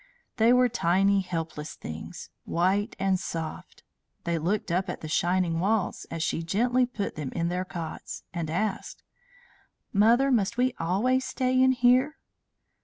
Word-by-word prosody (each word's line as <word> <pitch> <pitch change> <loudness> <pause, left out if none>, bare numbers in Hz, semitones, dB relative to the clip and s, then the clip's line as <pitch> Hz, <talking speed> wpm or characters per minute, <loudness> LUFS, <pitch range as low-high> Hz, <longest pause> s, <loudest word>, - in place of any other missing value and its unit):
They 230 +1 +5
were 250 0 +5
tiny, 195 -2 +2
helpless 165 -4 -5
things, 80 0 -8
white 195 +6 0
and 190 -1 +1
soft. 165 -2 -6 0.4
They 170 -1 -1
looked 185 +3 -1
up 185 +2 0
at - - -5
the 155 - -6
shining 175 +1 +1
walls 205 +2 0
as 165 -1 -3
she 165 - -1
gently 245 +9 +1
put 210 -5 -4
them 150 -4 -5
in 170 0 -1
their 180 +1 -2
cots, 170 -3 -7
and 170 -3 -3
asked: 195 +5 -3 0.9
"Mother, 235 +7 +4
must 230 -1 +1
we 250 0 +2
always 225 +10 +1
stay 255 0 +1
in 260 0 +5
here?" 255 +4 +3
195 Hz, 150 wpm, -27 LUFS, 170-240 Hz, 0.9 s, They